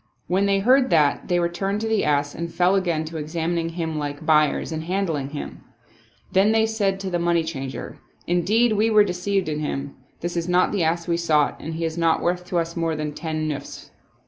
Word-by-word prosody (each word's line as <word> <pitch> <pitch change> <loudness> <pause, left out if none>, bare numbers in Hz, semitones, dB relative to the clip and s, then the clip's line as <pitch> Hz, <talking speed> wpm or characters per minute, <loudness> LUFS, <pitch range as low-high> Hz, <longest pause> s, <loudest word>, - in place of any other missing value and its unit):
When 190 +3 +1
they 200 0 +3
heard 255 +6 +4
that 150 -5 +2
they 175 -1 +2
re 170 - +2
turned 195 +4 -2
to 225 - -1
the 220 -2 +1
ass 145 -1 +1
and 170 0 -5
fell 180 +2 +2
again 170 -5 0
to 160 +1 -6
examining 165 +2 -2
him 165 -2 -3
like 145 +1 -5
buy 155 -2 +5
ers - - -4
and 160 0 -4
handling 165 -7 -1
him. 145 0 -7 0.7
Then 215 +4 +4
said 210 -3 0
they - - -11
to 195 -1 -4
the 175 - 0
money 170 -1 +2
changer, 135 -5 -6
" - - -34
Indeed 220 +6 +3
we 215 +2 +2
were 215 -1 +6
deceived 190 0 -1
in 150 -1 -2
him. 140 -2 -3 0.3
Ttiis 175 +1 -4
is 170 +1 -2
not 180 +1 +3
the 200 - 0
ass 170 +2 0
we 170 -1 +1
sought 155 -4 +2
and 160 +1 -6
he 165 0 -2
is 160 +1 -3
not 165 -1 +2
worth 180 +1 -1
to 180 - -1
us 165 0 -1
more 165 -2 -1
than 150 -1 -3
ten 155 0 -3
nusfs." 145 -2 -6
170 Hz, 225 wpm, -23 LUFS, 155-190 Hz, 0.7 s, were